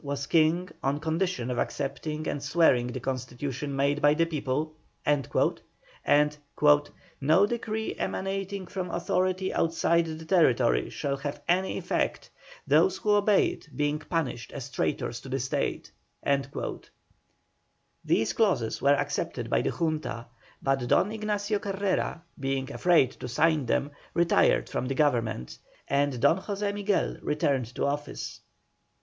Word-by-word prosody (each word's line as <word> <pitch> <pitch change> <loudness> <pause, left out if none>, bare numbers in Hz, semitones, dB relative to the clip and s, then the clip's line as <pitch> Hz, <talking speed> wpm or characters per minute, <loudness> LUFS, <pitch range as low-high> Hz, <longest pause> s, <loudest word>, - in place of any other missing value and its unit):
was 140 -1 -3
king 165 +4 +3
on 140 +2 0
condition 160 -5 -1
of 125 - -2
accepting 150 +3 -3
and 145 - -2
swearing 140 -6 +3
the 125 +1 -4
Constitution 130 +2 -4
made 140 +2 +1
by 145 +1 +5
the 165 +1 +3
people," 155 -1 -2 0.3
and 145 -3 +2 1.9
"no 160 +8 +5
decree 220 -1 -3
emanating 195 0 -3
from 180 0 -4
authority 185 +2 0
outside 165 0 +2
the 160 0 -6
territory 135 - +3
shall 140 -1 -2
have 140 +1 -5
any 185 +2 +1
effect, - - -2 0.3
those 390 - +4
who 210 - 0
obey 205 0 +4
it - - -9
being 150 +1 +1
punished 155 -8 -3
as 135 0 -7
traitors 80 - -2
to - - -10
the - - -1
State." - - -2 2.1
These 115 - +1
clauses 185 - +1
were 140 +1 +5
accepted - - -3
by - - +3
the - - 0
Junta, 155 -8 -2 0.4
but 135 0 +2
Don 200 - +3
Ignacio 210 -1 -1
Carrera, 195 -4 -1 0.2
being 135 0 -2
afraid 165 -6 +3
to - - -5
sign 150 +2 +2
them, 140 +4 0 0.2
retired 170 0 +3
from 125 - -3
the 135 - -2
Government, 120 - 0 0.3
and 140 -2 +1
Don 170 +10 +4
José 205 0 -2
Miguel 205 -1 0
returned 140 -5 0
to - - 0
office. 145 +1 -4
150 Hz, 135 wpm, -28 LUFS, 135-185 Hz, 2.1 s, by